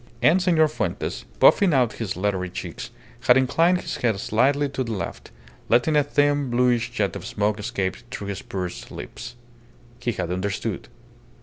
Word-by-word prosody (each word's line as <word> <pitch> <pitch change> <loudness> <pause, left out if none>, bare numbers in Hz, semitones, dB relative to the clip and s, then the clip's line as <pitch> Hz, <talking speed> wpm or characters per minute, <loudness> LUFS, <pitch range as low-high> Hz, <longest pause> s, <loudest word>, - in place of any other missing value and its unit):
And 170 +9 +5
Senor 165 -4 +4
Fuentes, 155 - -3
puffing 190 -7 +6
out 125 -4 +3
his 100 -5 -3
leathery 95 -1 -1
cheeks, 90 - -6 0.3
had 125 - +5
inclined 165 +7 +3
his - - -4
head 110 -5 0
slightly 135 +8 +2
to 135 -1 -2
the 115 -2 -4
left, 100 - -5 0.4
letting 125 +7 +3
a 150 - +5
thin, 145 -1 +1
bluish 120 0 +2
jet 105 -5 -1
of - - -6
smoke 105 +1 -1
escape 100 -4 -2
through 100 -5 -6
his 100 - -4
pursed 90 -2 -5
lips. - - -8 0.6
He 120 -1 -1
had 90 -3 -3
understood. 100 +2 -3
120 Hz, 165 wpm, -24 LUFS, 100-145 Hz, 0.6 s, puffing